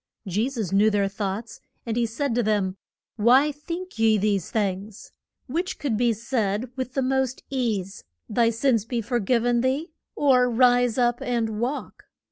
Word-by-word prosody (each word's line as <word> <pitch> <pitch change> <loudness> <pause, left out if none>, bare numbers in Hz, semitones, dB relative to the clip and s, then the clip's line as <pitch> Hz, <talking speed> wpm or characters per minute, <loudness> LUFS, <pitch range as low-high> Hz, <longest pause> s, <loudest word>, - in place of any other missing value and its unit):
Je 210 +7 0
sus 225 -9 -4
knew 205 +2 +4
their 205 -2 +1
thoughts, 200 +3 -5 0.2
and 225 -2 -2
he 235 -1 +1
said 265 +3 -2
to 240 - +2
them, 205 -4 0 0.4
Why 255 +7 +5
think 335 +1 -7
ye 220 -1 +4
these 200 -3 0
things? 200 -1 -3 0.3
Which 335 +8 -3
could 275 -7 -1
be 240 +2 +2
said 225 0 -2
with 260 -1 -5
the 270 - +1
most 265 -1 0
ease, 215 -8 -2 0.2
Thy 230 +1 +2
sins 230 -1 +1
be 235 +1 -2
for 240 +2 -1
giv 235 +3 +1
en 240 -1 +2
thee, 275 +6 -1 0.2
or 255 -3 +4
Rise 245 0 +3
up 240 -1 +2
and 225 -3 -1
walk? 260 +5 -4
235 Hz, 170 wpm, -25 LUFS, 210-255 Hz, 0.4 s, Why